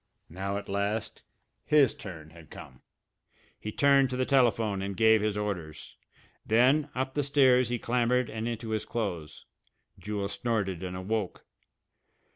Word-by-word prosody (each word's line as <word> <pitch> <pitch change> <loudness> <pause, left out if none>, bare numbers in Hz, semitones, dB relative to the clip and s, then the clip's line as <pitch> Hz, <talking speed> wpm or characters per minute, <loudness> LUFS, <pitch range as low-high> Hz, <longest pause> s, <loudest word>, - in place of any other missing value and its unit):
Now, 95 +4 -4
at 100 - -7
last, 100 +2 -2 0.4
his 150 -5 +4
turn 80 -5 -10
had 80 -2 -15
come! 65 - -12 0.8
He 105 - -5
turned 140 +1 +4
to 125 - -3
the 130 - +1
telephone 115 -7 +2
and 100 0 -4
gave 110 -1 +5
his 105 -1 -1
orders. 90 -7 -5 0.5
Then 130 +7 +3
up 130 +1 -2
the 145 - 0
stairs 130 -3 +4
he 120 - -1
clambered 125 +1 +1
and 110 +1 -4
into 115 -1 -4
his 110 -1 -1
clothes. 90 -10 -5 0.5
Jewel 105 -1 -3
snorted 100 -4 -2
and 90 -1 -5
awoke. 100 +1 -3
110 Hz, 145 wpm, -28 LUFS, 100-125 Hz, 0.8 s, gave